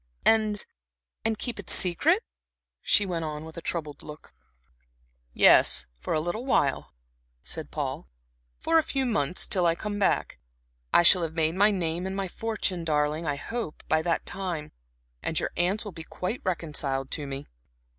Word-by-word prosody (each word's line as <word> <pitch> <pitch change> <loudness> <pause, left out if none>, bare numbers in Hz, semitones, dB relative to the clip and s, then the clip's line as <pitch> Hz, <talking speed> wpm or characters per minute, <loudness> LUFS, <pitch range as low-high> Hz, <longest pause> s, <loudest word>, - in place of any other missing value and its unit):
"And 215 -2 +3 0.6
and 220 -1 0
keep 235 -1 -5
it 200 - -8
secret?" 315 - +3 0.6
she 205 - +3
went 170 -3 -3
on, 155 0 -5
with 160 - -11
a 170 - -7
troubled 155 -4 -4
look. 150 - -12 1.0
"Yes, - - +6
for - - -2
a - - +2
little 175 +9 -3
while," 145 - 0 0.5
said - - -4
Paul, 60 - -4 0.5
"for 330 0 +3
a - - +4
few 275 -4 -1
months, 185 - 0
till 180 -3 +1
I 165 - +2
come 205 +3 -4
back. 190 - 0 0.5
I - - +5
shall 180 +1 +8
have 160 -1 -3
made 160 -1 +1
my 200 +3 +4
name 175 -2 -2
and 190 - -4
my 195 -1 -2
fortune, 200 -3 -2
darling, 150 +1 0
I 145 - 0
hope, 220 +3 -5
by 155 0 +2
that 170 0 -1
time, 175 -6 -4 0.5
and - - +1
your - - -2
aunts 190 +6 0
will 205 - -6
be 160 -2 -8
quite 185 +8 -4
reconciled 150 -7 -2
to 150 -3 -4
me." 135 0 -6
175 Hz, 170 wpm, -27 LUFS, 155-205 Hz, 1.0 s, shall